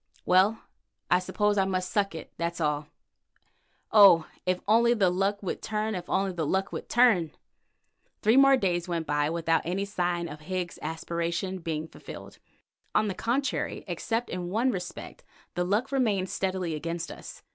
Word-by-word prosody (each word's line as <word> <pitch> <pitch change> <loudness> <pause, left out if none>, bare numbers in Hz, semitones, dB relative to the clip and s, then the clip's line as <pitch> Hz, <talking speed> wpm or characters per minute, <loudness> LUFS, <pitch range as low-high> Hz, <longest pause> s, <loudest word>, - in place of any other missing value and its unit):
Well, 195 +5 +3 0.5
I 180 - +6
suppose 205 +2 0
I 190 - +3
must 185 -1 -2
suck 200 -4 0
it, 160 - -9
that's 170 0 -3
all. 150 -2 -1 1.0
Oh! 190 -7 +8 0.2
if 185 0 +1
only 235 +3 +4
the 195 -5 +3
luck 195 +3 0
would 185 - -3
turn, 215 0 -2
if 180 -2 -6
only 195 0 +1
the 170 -3 -3
luck 190 +6 0
would - - -6
turn!" 215 -10 +4 0.9
Three 220 +3 +4
more 275 0 +7
days 175 -5 0
went 170 -2 -2
by 145 0 +1
without 165 0 +1
any 185 +4 -2
sign 175 -3 -1
of 150 -1 -8
Higgs's 175 +2 -4
aspiration 170 +3 -3
being 160 -2 -3
fulfilled. - - -11 0.6
On 215 -1 +3
the - - -2
contrary, 255 +8 -1
except 230 +1 -2
in 175 -1 -4
one 230 +7 +1
respect, 180 -5 -7 0.3
the 175 - 0
luck 210 +9 0
remained 205 -9 +1
steadily 185 -4 -2
against 165 +2 -4
us. - - -10
185 Hz, 165 wpm, -28 LUFS, 170-210 Hz, 1.0 s, Oh